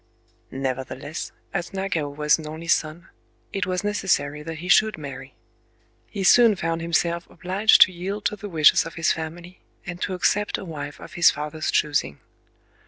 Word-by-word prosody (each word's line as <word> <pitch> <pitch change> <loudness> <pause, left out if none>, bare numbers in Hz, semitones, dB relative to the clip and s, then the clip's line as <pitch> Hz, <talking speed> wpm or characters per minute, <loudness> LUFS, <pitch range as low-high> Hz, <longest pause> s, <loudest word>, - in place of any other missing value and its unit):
Nevertheless, 135 +3 -5 0.2
as 175 0 -3
Nagao 175 -6 -2
was 150 +2 +1
an 155 - -7
only 160 +2 -8
son, 170 +1 -1 0.4
it 195 -2 -1
was 185 +1 -2
necessary 185 -8 0
that 160 +1 -6
he 175 +4 -7
should 215 +3 +4
marry. 135 -3 -9 0.7
He 200 - -5
soon 230 +2 +6
found 165 -2 -2
himself 170 +1 -1
obliged 195 +4 +3
to 185 - +8
yield 195 +4 -5
to - - +1
the 205 0 -8
wishes 155 -4 +5
of 165 - -9
his 165 - +1
family, 170 +3 -6 0.3
and 175 0 -7
to 190 - -2
accept 205 +3 +1
a - - -8
wife 145 -4 -7
of - - -11
his 175 -2 +6
father's 150 +1 -4
choosing. 145 - 0
170 Hz, 170 wpm, -24 LUFS, 150-185 Hz, 0.7 s, to